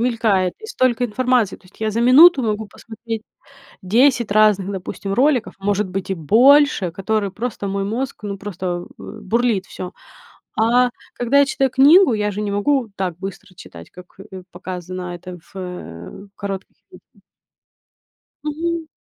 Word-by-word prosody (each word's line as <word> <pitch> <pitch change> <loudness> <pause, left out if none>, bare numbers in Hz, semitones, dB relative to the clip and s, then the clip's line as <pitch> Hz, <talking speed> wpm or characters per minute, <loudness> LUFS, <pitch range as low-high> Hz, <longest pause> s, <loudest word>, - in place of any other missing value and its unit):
мелькает, 220 -7 +1
и 440 - -9
столько 255 - +1
информации. 245 -2 +1
То - - -29
есть 185 - -21
я 220 - 0
за 225 +2 -1
минуту 265 +4 +7
могу 215 -1 -2
посмотреть 225 +1 -8 0.6
10 235 +3 +3
разных, 205 -2 +3
допустим, 195 +1 -5
роликов, 260 0 +1
может 205 0 0
быть, 190 +1 -5
и - - +1
больше, 235 - +4
которые 200 +3 -2
просто 215 -1 -4
мой 195 0 -2
мозг, 230 +2 -4
ну, 200 -1 -4
просто, 185 -3 -5
э, - - -12 0.2
бурлит 225 -2 0
всё. 185 0 -8 0.7
А 240 +3 +3 0.2
когда 245 +4 +2
я 280 - +6
читаю 270 -1 0
книгу, 280 +4 +6
я 210 -1 -1
же 200 - -5
не 205 - -2
могу 235 +4 0
так 180 -4 -3
быстро 190 -1 -8
читать, 85 - -13
как, 180 0 -15
э, 185 -1 -9
показано 180 0 -6
это 180 +1 -9 0.2
в, - - -10
э, 180 - -8
коротких 195 -1 -6
видео. - - -20 1.2
Мгм. 325 +2 -3
210 Hz, 155 wpm, -20 LUFS, 190-250 Hz, 1.2 s, минуту